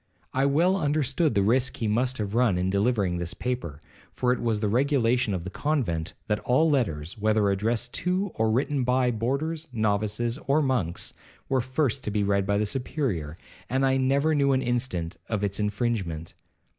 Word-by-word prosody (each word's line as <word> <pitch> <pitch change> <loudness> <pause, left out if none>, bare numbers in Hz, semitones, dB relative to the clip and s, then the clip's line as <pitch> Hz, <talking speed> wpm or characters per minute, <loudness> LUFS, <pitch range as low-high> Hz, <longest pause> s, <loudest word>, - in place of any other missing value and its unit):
I 135 +2 +2
well 170 +7 +3
understood 150 -1 +1
the 100 - +3
risk 125 +5 +2
he 115 - -1
must 125 +4 +1
have 105 -2 -3
run 115 -6 +3
in 90 +1 0
delivering 100 -4 +1
this 85 0 -3
paper, 120 - -4 0.3
for 125 0 +1
it 125 - -4
was 115 -3 0
the 105 - 0
regulation 125 -1 +2
of 85 - -4
the 95 - -6
convent, 95 - -1
that 105 -1 0
all 130 +6 +2
letters, 100 - -1
whether 105 -1 +2
addressed 115 +5 -1
to 185 +2 0
or 110 0 +1
written 135 +4 +1
by 125 0 +2
boarders, 140 +8 -2
novices, 110 +2 0
or 140 +3 +4
monks, 105 - -1 0.4
were 130 -1 +2
first 130 +1 0
to - - -1
be 105 0 0
read 100 -1 +1
by 100 0 +2
the 105 - +1
Superior, 105 - -2 0.3
and 135 +2 +1
I 135 0 +3
never 140 +4 +2
knew 140 -2 +3
an 130 0 +1
instance 120 -9 -2
of 105 -2 -1
its 100 0 -1
infringement. 100 -6 -2
120 Hz, 180 wpm, -26 LUFS, 100-135 Hz, 0.4 s, or